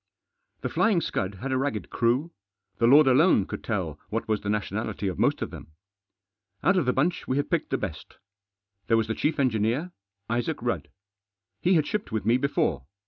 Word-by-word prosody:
The -, -, -2 dB
Flying 215 Hz, -6 st, +3 dB
Scud 95 Hz, -, -2 dB
had 130 Hz, +8 st, -5 dB
a 130 Hz, -, +1 dB
ragged 130 Hz, -9 st, -2 dB
crew, 125 Hz, +8 st, +1 dB, 0.5 s
The 115 Hz, -, +4 dB
Lord 145 Hz, +5 st, +8 dB
alone 135 Hz, -, +5 dB
could -, -, -7 dB
tell 90 Hz, -9 st, -3 dB
what 115 Hz, +2 st, -3 dB
was 110 Hz, -2 st, 0 dB
the 100 Hz, -, -4 dB
nationality 105 Hz, 0 st, -2 dB
of 95 Hz, -, -3 dB
most -, -, +2 dB
of -, -, -6 dB
them. 80 Hz, -, -11 dB, 0.9 s
Out 195 Hz, -, +4 dB
of 175 Hz, -8 st, +1 dB
the -, -, +5 dB
bunch 170 Hz, +8 st, 0 dB
we 130 Hz, -, 0 dB
had 145 Hz, -, -1 dB
picked -, -, 0 dB
the -, -, 0 dB
best. -, -, -7 dB, 0.7 s
There 115 Hz, -, +4 dB
was 110 Hz, -, +2 dB
the 110 Hz, -, -1 dB
chief 150 Hz, +7 st, 0 dB
engineer, 125 Hz, +6 st, +1 dB, 0.4 s
Isaac 120 Hz, +7 st, -1 dB
Rudd. 85 Hz, -, -2 dB, 0.7 s
He 180 Hz, +1 st, +3 dB
had 155 Hz, -3 st, +3 dB
shipped 210 Hz, +5 st, -3 dB
with 110 Hz, -2 st, -2 dB
me 115 Hz, +3 st, +4 dB
before. 85 Hz, -, 0 dB
120 Hz, 195 wpm, -26 LUFS, 105-145 Hz, 0.9 s, Lord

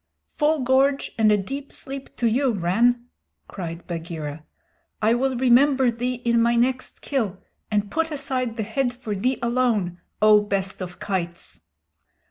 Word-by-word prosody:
"Full 300 Hz, 0 st, 0 dB
gorge 270 Hz, +2 st, +2 dB
and 215 Hz, -1 st, +5 dB
a 210 Hz, -, +5 dB
deep 275 Hz, +8 st, -5 dB
sleep 270 Hz, 0 st, -5 dB
to 240 Hz, -, -2 dB
you, 245 Hz, +3 st, +2 dB
Rann," 230 Hz, +7 st, +2 dB, 0.4 s
cried 170 Hz, -2 st, -6 dB
Bagheera. 160 Hz, -3 st, -5 dB, 0.6 s
"I 220 Hz, +2 st, +3 dB
will 260 Hz, +1 st, 0 dB
remember 260 Hz, +1 st, +4 dB
thee 245 Hz, +2 st, -2 dB
in 235 Hz, -1 st, +3 dB
my 235 Hz, +1 st, +3 dB
next 255 Hz, +2 st, 0 dB
kill, 220 Hz, -9 st, -1 dB, 0.3 s
and 205 Hz, -1 st, 0 dB
put 325 Hz, 0 st, 0 dB
aside 260 Hz, -5 st, -2 dB
the 220 Hz, -, -1 dB
head 245 Hz, +3 st, -1 dB
for 245 Hz, -4 st, -5 dB
thee 250 Hz, +7 st, 0 dB
alone, 235 Hz, -8 st, 0 dB, 0.2 s
O 215 Hz, -1 st, +6 dB
best 195 Hz, -2 st, -2 dB
of 180 Hz, -1 st, -6 dB
kites!" 175 Hz, -, -4 dB
235 Hz, 150 wpm, -24 LUFS, 200-260 Hz, 0.6 s, O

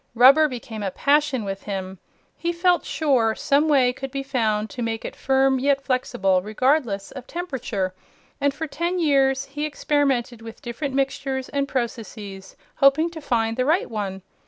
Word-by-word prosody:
Rubber 275 Hz, +6 st, +7 dB
became 235 Hz, -5 st, -7 dB
a 200 Hz, -, -1 dB
passion 280 Hz, 0 st, +1 dB
with 195 Hz, 0 st, -4 dB
him. 190 Hz, -2 st, -5 dB, 0.4 s
He 345 Hz, -, -2 dB
felt 350 Hz, +1 st, +2 dB
sure 250 Hz, -8 st, +1 dB
some 285 Hz, +3 st, +2 dB
way 260 Hz, -5 st, +4 dB
could 270 Hz, +1 st, -6 dB
be 275 Hz, +1 st, -4 dB
found 220 Hz, -6 st, 0 dB
to 250 Hz, -, -6 dB
make 225 Hz, -1 st, -3 dB
it -, -, -6 dB
firm 265 Hz, 0 st, +2 dB
yet 275 Hz, +1 st, +2 dB
flexible 195 Hz, -8 st, +1 dB
regardless 215 Hz, -1 st, 0 dB
of 260 Hz, -2 st, -9 dB
temperature, 250 Hz, -, -3 dB, 0.5 s
and 285 Hz, 0 st, +3 dB
for 300 Hz, +4 st, -5 dB
ten 340 Hz, +4 st, -2 dB
years 275 Hz, -4 st, +2 dB
he 295 Hz, +2 st, -5 dB
experimented 275 Hz, -5 st, 0 dB
with 225 Hz, 0 st, -10 dB
different 260 Hz, +3 st, -4 dB
mixtures 270 Hz, -1 st, -1 dB
and 280 Hz, -1 st, -1 dB
processes, 215 Hz, -6 st, -5 dB, 0.2 s
hoping 295 Hz, +5 st, +4 dB
to 325 Hz, -2 st, -8 dB
find 225 Hz, -4 st, 0 dB
the 255 Hz, -, +1 dB
right 320 Hz, -1 st, +1 dB
one. 195 Hz, -3 st, -4 dB
265 Hz, 165 wpm, -23 LUFS, 225-285 Hz, 0.5 s, Rubber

